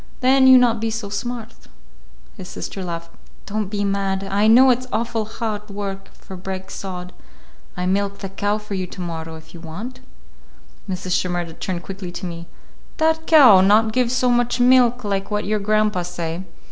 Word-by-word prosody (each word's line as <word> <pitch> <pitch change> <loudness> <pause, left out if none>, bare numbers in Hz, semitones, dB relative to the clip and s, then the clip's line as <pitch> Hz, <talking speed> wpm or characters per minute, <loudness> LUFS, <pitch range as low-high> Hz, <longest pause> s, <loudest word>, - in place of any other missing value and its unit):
Then 260 +1 +5
you 260 0 +9
not 235 -3 +3
be 225 - 0
so 220 -2 -4
smart." 230 +2 -5 0.8
His - - -9
sister 195 - -6
laughed. 170 -1 -6 0.3
"Don't 210 0 -2
be 205 +1 -2
mad. 195 -1 -1
I 200 +2 +1
know 255 +4 +7
it's 250 +1 -1
awful 230 -1 -1
hard 215 -1 -5
work 195 -1 -6
for 190 - -11
break 190 +1 -6
sod. 180 -2 -7 0.6
I 180 - -2
milk 200 +2 0
the 195 - -6
cow 205 +2 -1
for 210 -1 -8
you 185 -1 -2
to - - -11
morrow, 165 -2 -5
if 160 0 -14
you 170 - -10
want." 190 +11 -8 0.9
Mrs. 185 0 -4
Shimerda 175 -2 -1
turned 180 -2 -3
quickly 190 -2 -7
to 180 +1 -6
me. 170 -1 -7 0.5
"That 320 0 +1
cow 255 - +8
not 215 +3 +4
give 250 -1 +1
so 250 -1 +2
much 245 +1 +1
milk 245 -1 +4
like 200 -1 -2
what 210 0 -2
your 210 +1 0
grandpa 210 -2 +1
say. 175 0 -5
200 Hz, 180 wpm, -21 LUFS, 185-230 Hz, 0.9 s, you